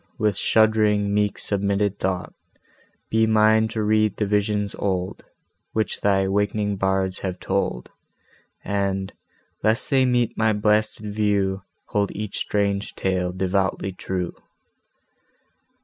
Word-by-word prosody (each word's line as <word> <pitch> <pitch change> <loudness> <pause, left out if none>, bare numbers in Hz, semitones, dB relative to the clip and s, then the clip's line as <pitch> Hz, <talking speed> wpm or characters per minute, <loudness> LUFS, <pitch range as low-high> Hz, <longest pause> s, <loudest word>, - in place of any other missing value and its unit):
with 105 -3 +1
shudd'ring, 105 -1 +3
meek 105 0 +1
submitted 100 0 -1
thought 95 -1 -2 0.8
Be 110 0 +3
mine 110 0 +4
to 110 -1 -3
read 110 -1 +2
the 105 - 0
visions 105 0 0
old 95 -2 -2 0.5
Which 110 -1 -1
thy 95 -1 +3
awak'ning 105 +1 0
bards 95 -1 0
have 95 -2 -4
told, 95 -10 -2 0.7
And, 100 -1 -1 0.5
lest 110 +6 +2
they 135 -2 +4
meet 120 -2 +1
my 110 -1 +2
blasted 105 0 0
view, 100 -2 +1 0.3
Hold 100 -1 0
each 105 -1 -4
strange 100 -1 -1
tale 90 -1 -1
devoutly 95 +1 -1
true. 90 -1 -4
100 Hz, 115 wpm, -23 LUFS, 95-110 Hz, 0.8 s, mine